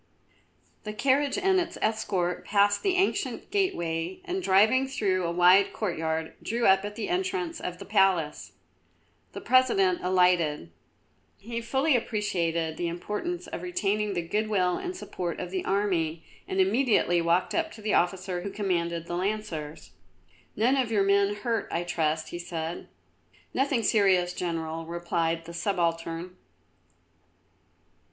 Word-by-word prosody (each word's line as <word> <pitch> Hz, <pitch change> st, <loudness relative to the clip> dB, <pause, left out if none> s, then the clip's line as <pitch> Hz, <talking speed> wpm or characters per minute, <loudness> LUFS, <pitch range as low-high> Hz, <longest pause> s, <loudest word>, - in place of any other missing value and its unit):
The 210 Hz, -, -5 dB
carriage 275 Hz, -, +1 dB
and 385 Hz, -1 st, +3 dB
its 345 Hz, -, -3 dB
escort 190 Hz, -5 st, -1 dB
passed 205 Hz, 0 st, +2 dB
the 385 Hz, -2 st, +1 dB
ancient 375 Hz, +2 st, -1 dB
gateway 170 Hz, -, -1 dB
and 375 Hz, +1 st, -2 dB
driving 220 Hz, -, +4 dB
through 195 Hz, -8 st, 0 dB
a 170 Hz, -, -1 dB
wide 180 Hz, +3 st, +5 dB
courtyard 160 Hz, -5 st, -2 dB
drew 235 Hz, +2 st, -1 dB
up 190 Hz, 0 st, +5 dB
at 205 Hz, 0 st, -5 dB
the 225 Hz, -, -3 dB
entrance 365 Hz, -1 st, -2 dB
of 180 Hz, 0 st, -5 dB
the -, -, -9 dB
palace. 190 Hz, -7 st, +1 dB, 0.8 s
The -, -, -7 dB
President 195 Hz, -8 st, +3 dB
alighted. 180 Hz, -, +2 dB, 0.7 s
He 230 Hz, +3 st, -5 dB
fully 265 Hz, +5 st, +1 dB
appreciated 170 Hz, -8 st, -1 dB
the 175 Hz, -, -1 dB
importance 210 Hz, -, -4 dB
of -, -, -6 dB
retaining 210 Hz, -, -1 dB
the 175 Hz, -, -1 dB
good 215 Hz, +5 st, 0 dB
will 185 Hz, -4 st, +2 dB
and 365 Hz, -1 st, -5 dB
support 175 Hz, -, -5 dB
of 180 Hz, -1 st, -5 dB
the 185 Hz, -1 st, -2 dB
army, 175 Hz, -5 st, 0 dB, 0.2 s
and 190 Hz, -, -2 dB
immediately 195 Hz, -3 st, +3 dB
walked 170 Hz, +2 st, +1 dB
up 330 Hz, -1 st, 0 dB
to 220 Hz, -, -12 dB
the 215 Hz, -, 0 dB
officer 180 Hz, 0 st, 0 dB
who 200 Hz, -, -4 dB
commanded 170 Hz, -5 st, -2 dB
the 175 Hz, -, -4 dB
Lancers. 175 Hz, -, -4 dB, 0.6 s
"None 245 Hz, +6 st, +2 dB
of 250 Hz, -4 st, 0 dB
your 205 Hz, -3 st, +3 dB
men 200 Hz, +1 st, +3 dB
hurt, 230 Hz, +2 st, -2 dB
I 170 Hz, -, -1 dB
trust," 160 Hz, -2 st, -1 dB
he 175 Hz, -, -6 dB
said. 170 Hz, -1 st, -5 dB, 0.7 s
"Nothing 270 Hz, -3 st, +1 dB
serious, 190 Hz, -4 st, +3 dB
General," 165 Hz, -2 st, -3 dB
replied 170 Hz, -1 st, -1 dB
the 170 Hz, -, -9 dB
subaltern. 170 Hz, -1 st, -2 dB
190 Hz, 145 wpm, -27 LUFS, 170-225 Hz, 0.8 s, wide